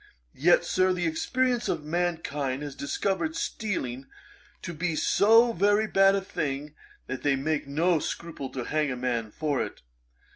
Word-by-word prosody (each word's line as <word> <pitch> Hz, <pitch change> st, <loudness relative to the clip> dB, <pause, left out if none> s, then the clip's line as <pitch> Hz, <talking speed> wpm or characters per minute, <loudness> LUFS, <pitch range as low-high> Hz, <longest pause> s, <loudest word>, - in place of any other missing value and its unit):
Yet, 175 Hz, +4 st, +4 dB
Sir, 185 Hz, +1 st, +2 dB
the 180 Hz, -1 st, -2 dB
experience 245 Hz, +9 st, 0 dB
of 150 Hz, -, -1 dB
mankind 150 Hz, -5 st, -2 dB
has 145 Hz, -2 st, -5 dB
discovered 165 Hz, +3 st, -2 dB
stealing 135 Hz, -, -3 dB, 0.6 s
to 170 Hz, -, -5 dB
be 165 Hz, +1 st, -2 dB
so 225 Hz, +8 st, +5 dB
very 205 Hz, +3 st, +3 dB
bad 195 Hz, -2 st, +4 dB
a 195 Hz, -, 0 dB
thing, 145 Hz, -5 st, -4 dB, 0.3 s
that 130 Hz, -, -5 dB
they 145 Hz, -1 st, +2 dB
make 145 Hz, +2 st, -1 dB
no 165 Hz, +4 st, +2 dB
scruple 155 Hz, -4 st, -5 dB
to 130 Hz, -, -3 dB
hang 150 Hz, +2 st, 0 dB
a 125 Hz, -, -3 dB
man 120 Hz, -3 st, -2 dB
for 145 Hz, +3 st, -1 dB
it. -, -, -6 dB
160 Hz, 155 wpm, -27 LUFS, 140-185 Hz, 0.6 s, so